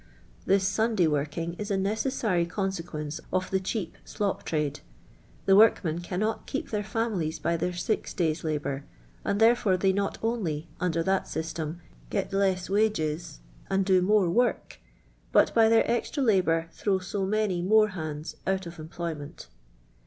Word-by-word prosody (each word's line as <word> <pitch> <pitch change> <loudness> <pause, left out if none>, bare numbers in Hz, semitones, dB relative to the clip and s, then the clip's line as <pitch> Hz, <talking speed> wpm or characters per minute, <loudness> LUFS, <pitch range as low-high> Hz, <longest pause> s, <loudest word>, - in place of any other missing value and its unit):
This 195 0 +3
Sunday 220 -5 +2
working 155 +3 -1
is 210 0 -4
a 200 - +1
necessary 200 -3 0
con 195 +2 -1
sequence 155 -4 -5
of 185 0 -1
the 190 - +2
cheap 190 -2 -3
*!•»»• 205 -3 -2
trade. 150 -2 -1 0.7
The 195 - +6
workmen 185 -6 +4
cannot 205 +5 -2
keep - - -3
thi 215 - -1
ir 205 - -2
families 200 -7 -1
by 170 - 0
their 180 +2 -1
six 210 +5 -2
days' 165 -4 0
labour, 145 -3 -2 0.4
and 200 - 0
there 230 +2 +6
fore 190 -6 +1
they 190 +1 +2
not 200 +1 -1
only, 175 -10 -1
under 170 -2 0
that 190 +2 0
M 160 - 0
stem, 160 +1 -5 0.3
gel 200 - 0
K - - -15 0.3
ss 180 -1 -8
wnges 185 - 0 0.3
and 195 0 +1
do 185 -1 +4
more 200 0 +3
work, 240 +8 0 0.5
but - - +4
by 225 -1 +5
their 225 0 +5
extra 240 +4 0
la^Kinr 165 -7 +2
throw 195 +1 0
so 190 +1 -3
many 205 -4 0
more 215 +3 +4
hands 155 -4 -6
out 190 -1 0
of 170 0 -9
em 155 0 -8
ployment. 160 -4 -6
185 Hz, 170 wpm, -27 LUFS, 165-210 Hz, 0.7 s, The